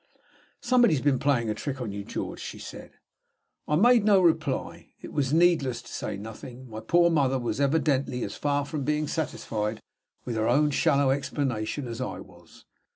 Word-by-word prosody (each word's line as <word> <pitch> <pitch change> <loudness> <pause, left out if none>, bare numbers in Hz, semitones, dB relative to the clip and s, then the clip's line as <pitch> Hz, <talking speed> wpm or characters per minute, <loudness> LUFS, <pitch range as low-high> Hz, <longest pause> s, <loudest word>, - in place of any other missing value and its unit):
"Somebody 240 -7 +4
has 135 - -3
been 140 -3 +2
playing 120 -6 +1
a - - 0
trick 135 +3 -5
on 120 -5 -4
you, 100 0 -5
George," - - -5
she - - -7
said. - - -10 0.7
I 150 - +1
made 235 +5 +5
no 205 -2 +5
reply. 160 -6 0
It - - -10
was 140 -3 0
needless 155 -7 +3
to 120 - -13
say - - -4
anything. 110 +5 -9
My 110 -2 -7
poor 170 +10 +3
mother 135 -4 +2
was 120 +1 -2
evidently 140 -3 +1
as - - -4
far 145 -1 0
from 145 -1 -4
being 150 +1 0
satisfied 110 -8 -3 0.5
with 120 -2 -3
her 110 +1 +1
own 145 +4 +3
shallow 140 0 +3
explanation 135 -2 -2
as 115 +1 -5
I 130 - -4
was. 85 -2 -16
140 Hz, 180 wpm, -27 LUFS, 120-150 Hz, 0.7 s, made